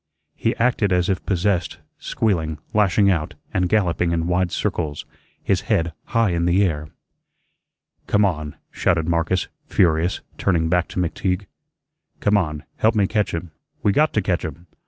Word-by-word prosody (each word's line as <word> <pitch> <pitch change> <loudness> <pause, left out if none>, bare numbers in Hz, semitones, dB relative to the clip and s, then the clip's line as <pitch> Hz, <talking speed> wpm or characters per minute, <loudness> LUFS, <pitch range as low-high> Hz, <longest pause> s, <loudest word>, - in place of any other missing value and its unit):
He - - 0
acted 115 -4 +1
as 90 +1 +2
if 95 -2 -1
possessed, 95 -1 0 0.2
squealing, 80 -8 -1 0.2
lashing 100 -1 +4
out, 80 -4 -2 0.2
and 90 -1 +1
galloping 85 -5 +1
in 85 -1 0
wide 90 0 +1
circles, 75 -3 -2 0.4
his - - +1
head 85 0 +1
high 115 -4 +2
in 85 0 0
the 90 +3 +4
air. 75 -5 -1 1.2
"Come 105 0 +3
on," 75 -5 -2 0.2
shouted 85 -4 +1
Marcus, 85 +2 +1 0.2
furious, 85 +1 +2 0.2
turning 85 -4 +1
back 90 0 +2
to - - -5
McTeague. 90 +2 -1 0.7
"Come 105 - +2
on, 75 -7 0
help 110 +1 +3
me 105 -2 +3
catch 105 0 0
him. 85 0 -5 0.3
We 105 - +4
got 150 +8 +3
to 105 - +1
catch 90 -2 0
him. 80 +1 -7
90 Hz, 155 wpm, -22 LUFS, 85-100 Hz, 1.2 s, lashing